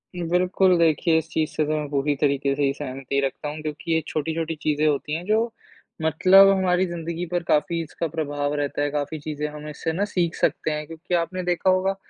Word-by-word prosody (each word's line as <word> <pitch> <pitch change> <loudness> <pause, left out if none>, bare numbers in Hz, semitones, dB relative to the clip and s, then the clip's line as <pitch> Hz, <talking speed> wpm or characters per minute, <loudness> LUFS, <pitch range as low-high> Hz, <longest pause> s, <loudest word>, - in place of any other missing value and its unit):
बिल्कुल, 180 +1 +2
देखिए 165 0 +3
इस 160 0 -1
चीज़ 155 -2 0
से 155 - 0
तो 155 - -2
मैं 150 -1 -2
पूरी 145 0 0
तरीके 140 -1 +1
से 145 - 0
ही 135 -1 +2
सहमति 135 -1 -3
रखता 145 +2 -4
हूँ, 155 +1 -6
क्योंकि 155 +2 -5
ये 160 - +2
छोटी-छोटी 160 +1 -2
चीज़ें 150 0 0
होती 150 0 0
हैं 170 - -5
जो 220 +3 +1 0.5
मतलब 185 +5 +6
हमारी 185 -1 +2
ज़िंदगी 170 0 -4
पर 175 -1 0
काफ़ी 165 +2 +1
इसका 165 +2 -4
प्रभाव 145 -2 -2
रहता 145 0 -2
है, 145 - +1
काफ़ी 150 +1 -3
चीज़ें 150 0 -4
हम 150 0 -8
इससे 155 +2 -3
ना 200 +4 0
सीख 175 -5 -1
सकते 155 - 0
हैं। 150 0 -3
क्योंकि 165 +3 -7
आपने 175 +2 -1
देखा 175 +1 +1
होगा, 185 +1 +2
160 Hz, 210 wpm, -24 LUFS, 150-175 Hz, 0.5 s, मतलब